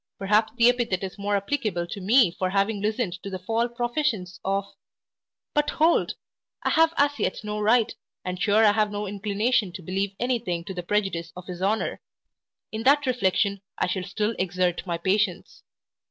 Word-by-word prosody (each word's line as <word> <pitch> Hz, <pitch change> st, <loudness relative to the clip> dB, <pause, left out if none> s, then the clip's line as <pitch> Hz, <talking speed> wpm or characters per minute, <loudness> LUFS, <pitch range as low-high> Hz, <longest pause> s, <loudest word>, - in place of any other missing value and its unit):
perhaps 210 Hz, +3 st, +2 dB
the 235 Hz, -1 st, +5 dB
epithet 240 Hz, -7 st, +1 dB
is 190 Hz, +1 st, -6 dB
more 205 Hz, +1 st, 0 dB
applicable 200 Hz, -4 st, -1 dB
to 195 Hz, +3 st, -7 dB
me 215 Hz, 0 st, +5 dB
for 185 Hz, +1 st, -2 dB
having 200 Hz, +2 st, 0 dB
listened 215 Hz, -2 st, -1 dB
to 200 Hz, -, -6 dB
the 190 Hz, -, -4 dB
false 225 Hz, +6 st, -1 dB
professions 240 Hz, -7 st, -1 dB
of 195 Hz, +1 st, 0 dB, 0.9 s
But, 295 Hz, 0 st, +2 dB
hold! 320 Hz, +2 st, +2 dB, 0.5 s
I -, -, +1 dB
have 325 Hz, 0 st, +5 dB
as 285 Hz, 0 st, +2 dB
yet -, -, -1 dB
no 210 Hz, 0 st, -3 dB
right, 220 Hz, +2 st, +3 dB, 0.3 s
and 180 Hz, 0 st, -4 dB
sure 210 Hz, +2 st, +4 dB
I 210 Hz, -, +7 dB
have 210 Hz, 0 st, +2 dB
no 205 Hz, 0 st, -3 dB
inclination 205 Hz, +1 st, 0 dB
to 185 Hz, -, -8 dB
believe 195 Hz, +3 st, -2 dB
any 245 Hz, 0 st, +1 dB
thing 175 Hz, -7 st, -3 dB
to 190 Hz, +2 st, -6 dB
the 180 Hz, -, -4 dB
prejudice 175 Hz, -3 st, -1 dB
of 180 Hz, -, -8 dB
his 180 Hz, -1 st, -7 dB
honour 210 Hz, +3 st, 0 dB, 0.7 s
In 220 Hz, -, -4 dB
that 285 Hz, +4 st, +4 dB
reflection 200 Hz, -4 st, +1 dB, 0.2 s
I -, -, +1 dB
shall 185 Hz, +1 st, -2 dB
still 210 Hz, +4 st, -2 dB
exert 185 Hz, 0 st, 0 dB
my 170 Hz, -1 st, -1 dB
patience. 190 Hz, +1 st, -1 dB
205 Hz, 185 wpm, -25 LUFS, 185-230 Hz, 0.9 s, I